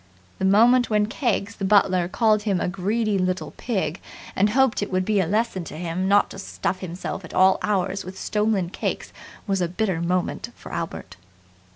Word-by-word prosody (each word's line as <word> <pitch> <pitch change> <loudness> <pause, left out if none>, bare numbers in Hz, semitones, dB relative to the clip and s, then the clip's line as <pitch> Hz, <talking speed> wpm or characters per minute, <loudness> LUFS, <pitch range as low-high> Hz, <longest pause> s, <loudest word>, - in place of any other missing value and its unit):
The 190 - 0
moment 235 +6 +5
when 210 -1 +3
Keggs, 210 -3 -2
the 195 - -6
butler, 190 -3 +3
called 215 +2 +2
him 200 -4 0
a - - -1
greedy 200 +3 0
little 185 0 -1
pig 190 -8 -2 0.3
and 200 +2 +3
hoped 265 0 +2
it 205 - -3
would 185 0 0
be 210 0 +2
a 185 - +1
lesson 210 -1 0
to - - -8
him 175 +2 -2
not 205 +1 +4
to 195 - -8
stuff 190 -1 -3
himself 185 +1 -5
at 165 - -10
all 190 0 +5
hours 195 -1 -1
with 185 +1 -9
stolen 210 -5 0
cakes - - -4 0.3
was 195 -2 0
a 175 - +1
bitter 180 -1 -1
moment 180 +6 -1
for - - -11
Albert. 95 - -5
195 Hz, 190 wpm, -24 LUFS, 185-210 Hz, 0.3 s, moment